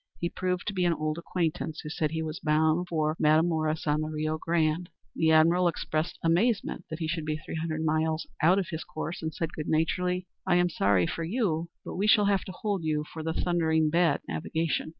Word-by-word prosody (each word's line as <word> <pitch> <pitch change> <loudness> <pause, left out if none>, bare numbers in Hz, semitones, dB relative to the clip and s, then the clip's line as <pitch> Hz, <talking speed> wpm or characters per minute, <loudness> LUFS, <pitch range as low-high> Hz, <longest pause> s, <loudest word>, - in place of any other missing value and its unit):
He 170 - -2
proved 180 0 -2
to 205 - -2
be 185 -2 0
an 170 - +3
old 155 +1 -2
acquaintance, 165 -2 -2
who 150 - -7
said 155 0 -1
he 160 +1 -2
was 160 +2 -5
bound 160 +1 +2
for 155 -2 0
Matamoras 155 0 +2
on 150 0 +1
the 155 - -2
Rio 155 0 -2
Grande! 165 +1 0 0.3
The 160 - +2
admiral 170 +3 +5
expressed 165 0 -2
amazement 190 +6 +1
that 160 - -4
he 160 -1 -3
should 160 0 -2
be 155 0 -2
three 155 - -9
hundred 160 -1 -2
miles 155 +1 +1 0.2
out 175 +5 +5
of 195 -1 -1
his 160 -3 -4
course, 155 +2 -5
and 160 -1 -2
said 165 0 -4
good 150 - -5
naturedly, 180 +3 0 0.2
"I 180 - +4
am 175 0 +3
sorry 100 - +3
for 165 - -3
you; 170 -4 -1 0.2
but - - -6
we 200 +3 +1
shall 210 -1 +6
have 200 -1 +2
to - - -6
hold 195 -1 -2
you 155 -1 0
for 160 - -5
your 160 +1 -2
thundering 160 -3 +1
bad 170 +1 +3
navigation!" 160 0 -2
160 Hz, 215 wpm, -28 LUFS, 155-175 Hz, 0.3 s, shall